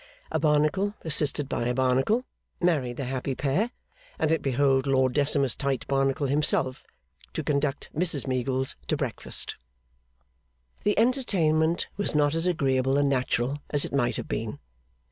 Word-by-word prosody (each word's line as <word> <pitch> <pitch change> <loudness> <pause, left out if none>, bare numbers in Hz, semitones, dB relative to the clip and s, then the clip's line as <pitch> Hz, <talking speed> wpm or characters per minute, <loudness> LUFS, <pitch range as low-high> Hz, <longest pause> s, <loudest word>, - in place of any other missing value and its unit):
A 160 - 0
Barnacle 155 +7 +1
(assisted 145 -2 +2
by 120 - -2
a 125 - 0
Barnacle) 130 - +1 0.3
married 145 -9 0
the 140 - -3
happy 130 +1 -3
pair, 150 - 0 0.5
and 155 - +1
it 160 - +1
behoved 135 0 +2
Lord 130 -2 +2
Decimus 140 -3 +3
Tite 135 -3 -2
Barnacle 135 +1 +1
himself 140 -1 +1 0.5
to - - -3
conduct 140 -1 -1
Mrs 160 -4 +2
Meagles 130 0 -1
to - - 0
breakfast. - - -2 1.3
The 205 - +1
entertainment 175 - +2
was 205 -6 +1
not 145 0 +3
as 165 +2 0
agreeable 135 -5 +1
and 145 -1 +2
natural 130 +1 0
as 145 -1 +3
it - - -7
might 120 -4 +1
have - - -5
been. 110 -1 -4
140 Hz, 145 wpm, -26 LUFS, 130-160 Hz, 1.3 s, Decimus